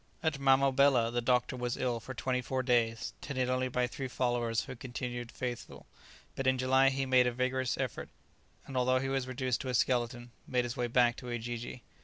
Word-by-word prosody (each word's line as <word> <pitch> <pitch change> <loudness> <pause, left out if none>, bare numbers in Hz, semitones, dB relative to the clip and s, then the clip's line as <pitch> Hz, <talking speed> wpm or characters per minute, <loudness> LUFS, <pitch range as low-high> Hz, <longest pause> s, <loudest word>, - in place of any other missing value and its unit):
At 160 -3 0
Mamobela 135 -3 +4
the 120 - +1
doctor 125 +1 +1
was 125 -1 -2
ill 125 -2 -1
for 130 +3 -8
twenty 125 +3 -1
four 130 +1 -2
days, 115 -3 +1
tended 130 -3 -1
only 130 0 +1
by 125 0 0
three 130 +2 -5
followers 120 -3 0
who 130 -1 -8
continued 120 -1 -5
faithful; 125 -2 -6 0.5
but 135 - -2
in 130 0 +3
July 130 +1 +4
he 135 0 -1
made 130 -1 +4
a - - +1
vigorous 130 0 -1
effort, - - -3 0.6
and 135 - -9
although 130 0 +3
he 135 +1 -1
was 135 -1 -1
reduced 130 -1 -1
to 130 - -4
a 125 - 0
skeleton, 120 +1 0 0.2
made 125 -1 +1
his 120 +1 -4
way 125 -2 -1
back 120 0 +3
to 125 - -8
Ujiji. 120 +1 -5
125 Hz, 200 wpm, -32 LUFS, 120-130 Hz, 0.6 s, Mamobela